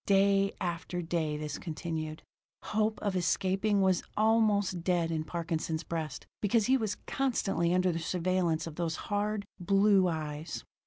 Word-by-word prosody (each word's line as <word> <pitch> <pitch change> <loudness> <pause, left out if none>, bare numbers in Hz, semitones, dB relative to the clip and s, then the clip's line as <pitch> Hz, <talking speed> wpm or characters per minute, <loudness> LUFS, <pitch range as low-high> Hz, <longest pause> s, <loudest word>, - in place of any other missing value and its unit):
Day 195 0 +4
after 175 0 -3
day 160 -3 -1
this 150 -1 -4
continued. 160 -2 -4 0.4
Hope 215 0 0
of 200 -2 0
escaping 190 +3 +1
was 190 -2 +3 0.2
almost 210 -5 +3
dead 170 -2 +1
in 160 -1 -1
Parkinson's 165 -1 -2
breast, 160 -2 -4 0.2
because 215 +1 +3
he 260 - +4
was 220 -6 0
constantly 195 -10 0
under 185 0 +3
the 165 - -2
surveillance 175 -1 0
of 165 -2 -8
those 165 -2 -1
hard, 205 +1 -2
blue 195 +1 +4
eyes. 155 -1 -4
180 Hz, 145 wpm, -31 LUFS, 165-200 Hz, 0.4 s, Day